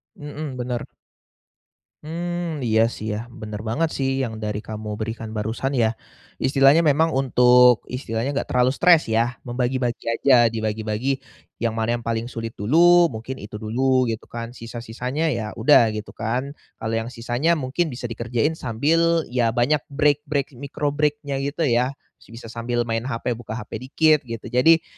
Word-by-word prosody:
Mhm, 145 -2 -7
benar. 120 -1 -3 1.2
Mmm, 170 -1 -4
iya 110 -1 +3
sih, 110 0 -4
ya, 105 - -2
benar 110 -3 -8
banget 160 +8 +1
sih, 135 -1 0
yang 110 -3 -4
dari 105 0 -3
kamu 105 0 -5
berikan 110 0 -5
barusan, 115 +6 -2
ya. 115 -2 +1 0.4
Istilahnya 135 +3 +5
memang 160 0 +3
untuk 125 -2 +5
istilahnya 125 0 -2
nggak 140 - -2
terlalu 125 0 +2
stres, 165 +3 +5
ya? 115 +2 +1
Membagi-bagi 125 0 -2
aja, 120 +1 +4
dibagi-bagi, 110 +3 -2 0.4
yang 115 -1 -1
mana 115 +1 0
yang - - -12
paling 115 +1 -2
sulit 115 -1 -6
dulu, 170 - +5
mungkin 115 +3 -6
itu 105 -3 -9
dulu, 130 +3 +1
gitu 115 -1 -5
kan? 120 +1 -6
Sisa-sisanya, 120 +6 -4
ya 110 -2 -4
udah, 115 -2 +6
gitu 105 0 -7
kan? 125 +6 -3 0.2
Kalau 110 0 -2
yang 115 +2 -3
sisanya 120 +6 0
mungkin 145 +5 -1
bisa 120 0 -5
dikerjain 120 +6 -1
sambil, 160 +7 +1
ya, 120 -2 +1
banyak 125 +5 +1
break-break 145 -1 0
micro 145 +2 -3
break-nya, 150 -1 0
gitu 145 +3 -1
ya? 125 +1 +2 0.3
Bisa 115 0 -11
sambil 120 +1 -1
main 115 +1 -2
HP 125 0 -2
buka 115 -1 -5
HP 110 -3 -6
dikit, 155 +4 +3
gitu. 115 -1 -6
Jadi, 160 +6 +5
125 Hz, 155 wpm, -23 LUFS, 115-140 Hz, 1.2 s, udah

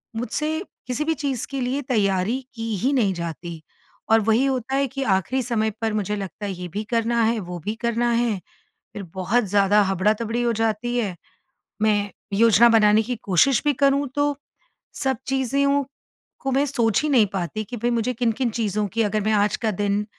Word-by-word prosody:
मुझसे 300 +7 -2 0.3
किसी 255 +4 -1
भी 320 - +1
चीज़ 275 -6 -3
के 275 -1 -3
लिए 255 +3 -1
तैयारी 215 -2 0
की 225 -1 -3
ही 255 +9 +1
नहीं 220 -8 +2
जाती। 170 -1 -6 0.5
और 225 0 +6
वही 225 +5 +2
होता 265 -1 -1
है 275 0 +2
कि 270 +2 -4
आखिरी 260 +8 -2
समय 220 -2 0
पर 225 -1 0
मुझे 210 -1 -1
लगता 200 +1 -6
है, 200 - -2
ये 180 0 -6
भी 200 +5 -4
करना 230 0 +1
है, 225 +1 +1
वो 180 -3 -6
भी 215 - -2
करना 235 0 +1
है, 235 -3 +1 0.6
फिर 205 - -6
बहुत 195 +6 +1
ज़्यादा 205 +1 +3
हबड़ातबड़ी 210 +5 0
हो 235 - +2
जाती 225 +2 -1
है। 200 -7 -2 0.7
मैं 205 -2 +2 0.2
योजना 230 +2 +6
बनाने 215 -1 +5
की 245 +3 -3
कोशिश 215 +7 +3
भी 295 - +3
करूँ 280 +1 +2
तो 290 0 +1 0.6
सब 265 -3 0
चीज़ें 270 +1 +1
ओ 280 0 +2 0.6
को 270 - -2
मैं 275 +2 +2
सोच 235 -7 +1
ही 305 - 0
नहीं 245 -7 +5
पाती, 195 +3 -3
कि 240 +4 -7
भई 235 +2 0
मुझे 235 +1 0
किन-किन 240 +1 0
चीज़ों 215 -2 -1
की 230 - +1
अगर 215 0 0
मैं 215 +2 +1
आज 205 -1 +2
का 225 -2 -1
दिन 205 +1 -1
225 Hz, 195 wpm, -23 LUFS, 205-255 Hz, 0.7 s, और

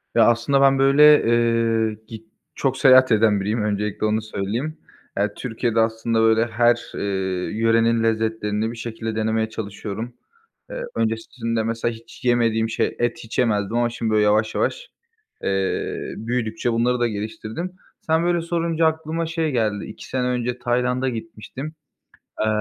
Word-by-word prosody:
Ya 115 - +6
aslında 120 +4 +2
ben 135 0 +5
böyle, 150 +2 +6
eee, 115 -2 +2
git 110 -1 -10 0.3
çok 135 -1 0
seyahat 130 -2 +6
eden 105 -2 +3
biriyim, 105 +3 -1
öncelikle 105 0 -1
onu 110 +1 +1
söyleyeyim. 110 +9 -4 0.4
Eee, 100 +1 +2
Türkiye'de 115 -1 -1
aslında 115 0 +1
böyle 110 0 +4
her, 120 +1 +2
eee, - - -4 0.6
yörenin 115 0 +3
lezzetlerini 110 -1 0
bir 120 - -9
şekilde 115 -1 -5
denemeye 110 0 0
çalışıyorum. 110 +2 -6 0.6
Eee, - - -5
öncesinde 115 +1 -2
mesela 115 +1 -1
hiç 115 +2 -14
yemediğim 115 -2 +2
şey, - - -1
et 120 0 0
hiç 115 - -5
yemezdim, 110 -2 +1
ama 120 0 +2
şimdi 115 -1 -3
böyle 105 -1 +3
yavaş 110 +1 +2
yavaş, - - -2 0.5
eee, 95 -1 -2
büyüdükçe 115 0 -2
bunları 120 +2 +1
da 120 - +2
geliştirdim. 110 - -5 0.3
Sen 160 +1 +1
böyle 175 -1 +1
sorunca 165 -1 0
aklıma 160 +1 -1
şey 165 -1 -1
geldi, 110 -5 -1
2 - - -10
sene 125 -1 -1
önce 125 0 -2
Tayland'a 125 +2 0
gitmiştim. 115 +5 -7 0.7
Eee, 110 - +1
115 Hz, 150 wpm, -22 LUFS, 110-125 Hz, 0.7 s, Ya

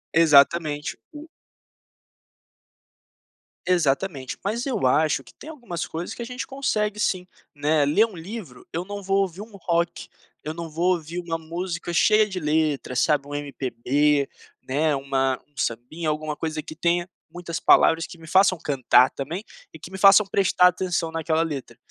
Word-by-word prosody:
Exatamente, 150 -1 +4 0.2
o 300 +1 -10 2.4
Exatamente. 150 -5 0
Mas 225 +5 -2
eu 255 - -1
acho 145 +2 +2
que - - -17
tem 310 - -12
algumas 235 - -5
coisas 165 +2 -5
que - - -9
a - - -3
gente 250 +1 -5
consegue 215 -6 -2
sim, 185 -3 0 0.3
né. 150 0 +2
Ler 155 +10 +4
um 220 -4 -11
livro 170 - -9
eu 170 +2 -2
não 205 +2 -7
vou 195 +1 +1
ouvir 190 0 -3
um 215 0 -11
rock, 170 -2 -2 0.3
eu 155 - -4
não 165 0 -6
vou 175 +4 +1
ouvir 170 +1 -6
uma 170 -2 -3
música 170 +2 -5
cheia 215 +4 +4
de 190 -3 -5
letra, 150 -4 0
sabe, 140 +2 +2
um 145 - -8
MPB, 140 +1 0 0.4
né 150 +3 +1
uma 135 -1 0
um 145 - -39
sambinha, 125 +8 -3
alguma 150 0 -2
coisa 155 0 -3
que 155 - -10
tenha 175 +2 0 0.2
muitas 170 -1 -5
palavras 165 +1 +5
que - - -12
me 160 - -13
façam 190 +2 +4
cantar 130 -3 +4
também 165 +9 -5 0.3
e - - -11
que - - -10
me 190 - -8
façam 195 +2 +7
prestar 190 -2 +4
atenção 180 -2 -1
naquela 160 0 0
letra, 150 -5 -5
165 Hz, 165 wpm, -24 LUFS, 150-190 Hz, 2.4 s, façam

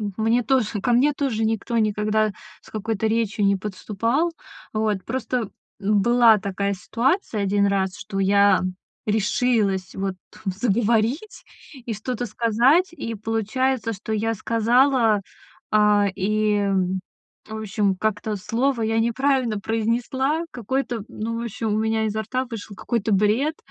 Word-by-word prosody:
м 205 -2 -3
мне 225 +2 +2
тоже, 230 -5 +1
ко 245 - +1
мне 275 +5 +4
тоже 255 -6 -1
никто 225 +1 -1
никогда 215 0 +1 0.3
с - - -18
какой-то 220 0 -2
речью 220 -2 0
не 200 0 +3
подступал. 220 - -1 0.4
Вот, 215 -3 -1
просто, 250 -2 -2 0.3
м, 205 0 +2
была 235 -1 +6
такая 200 0 -2
ситуация 235 - -1
1 200 +1 +2
раз, 190 -1 0
что 195 -1 -6
я 200 0 +4 0.5
решилась 210 -3 +1
вот 195 -1 -2 0.3
заговорить 230 - 0 0.4
и 235 - -3
что-то 245 +3 -4
сказать. 240 - +3
И 230 -9 -5
получается, 225 +2 -1
что 220 +2 -6
я 225 +1 0
сказала, 230 +1 +3 0.5
а, 210 -1 +4
и, 205 0 +1 0.8
в 220 - -6
общем, 205 -2 0
как-то 215 +1 -1
слово 235 +5 0
я 225 0 +1
неправильно 240 -1 +1
произнесла 240 +8 0
какое-то. 245 0 -2
Ну, 230 +2 -4
в - - -3
общем, 220 -1 -2
у - - +1
меня 220 0 +1
изо 215 +1 -2
рта 255 +4 -2
вышел 225 -4 -8
какой-то 225 -1 -1
бред. 220 +11 +2
220 Hz, 135 wpm, -23 LUFS, 205-240 Hz, 0.8 s, была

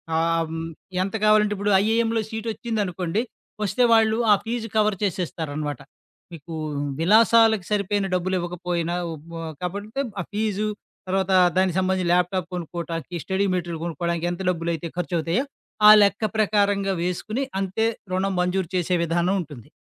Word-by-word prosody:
ఆహ్, 165 0 +1
హ్మ్, 165 0 -4 0.4
ఎంత 195 +3 -4
కావాలంటే 210 -1 +4
ఇప్పుడు 205 +1 0
ఐఐఎంలో 225 0 +1
సీటొచ్చిందనుకోండి, 215 -4 -2 0.4
వస్తే 210 +5 +1
వాళ్ళు 220 -1 +4
ఆ - - +9
ఫీజు 230 0 -3
కవర్ 215 -1 +3
చేసేస్తారనమాట. 155 -6 -3 0.5
మీకు 165 +1 -9 0.5
విలాసాలకి 220 +2 +5
సరిపోయిన 205 -1 0
డబ్బులివ్వకపోయినా, 175 -1 -2 0.2
ఉ - - -5 0.5
కాబట్టితే 205 +8 -3 0.2
ఆ - - -4
ఫీజు, 215 0 -1 0.4
తర్వాత 190 0 0 0.3
దానికి 185 -1 +2
సంబంధించి 185 -1 0
ల్యాప్టాప్ 180 0 +1
కొనుక్కోటానికి, 170 -1 -5
స్టడీ 190 +1 0
మెటిరిల్ 170 -2 -3
కొనుక్కోవడానికి, 170 +1 -2
ఎంత 175 +2 -5
డబ్బులైతే 170 -1 -3
ఖర్చువుతాయో, 175 - -1 0.4
ఆ - - +12
లెక్క 200 +2 +1
ప్రకారంగా 200 -2 +2
వేసుకొని, 215 +8 -2 0.2
అంతే 195 +4 0 0.3
రుణం 190 +1 0
మంజూరు 180 -1 0
చేసే 180 0 +1
విధానం 175 +3 +1
ఉంటుంది. 140 -7 -12
185 Hz, 125 wpm, -24 LUFS, 170-210 Hz, 0.5 s, ఆ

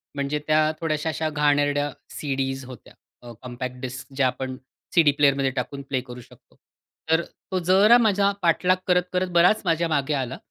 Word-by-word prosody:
म्हणजे 140 +1 -2
त्या 155 0 +3
थोड्याशा 155 0 -1
अशा 155 0 -2
घाणेरड्या 145 -1 +1 0.2
सीडीज 135 -2 -3
होत्या, 125 -3 -13 0.3
अ, 120 -1 -11
कॉम्पॅक्ट 125 0 -6
डिस्क 130 +1 -7
ज्या 135 -2 +3
आपण 130 +1 -4 0.4
सीडी 160 -4 +6
प्लेअरमध्ये 140 -2 +3
टाकून 140 +3 -5
प्ले 130 -2 -1
करू 125 0 -9
शकतो. - - -21 0.6
तर 165 +1 +4 0.3
तो 185 - 0
जरा 210 +6 +7
माझा 205 -3 +2
पाठलाग 180 +2 +2
करत 180 0 +3
करत 180 0 0
बराच 180 +5 +4
माझ्या 165 0 +1
मागे 150 -1 0
आला, 130 -2 -3
145 Hz, 165 wpm, -24 LUFS, 130-165 Hz, 0.6 s, जरा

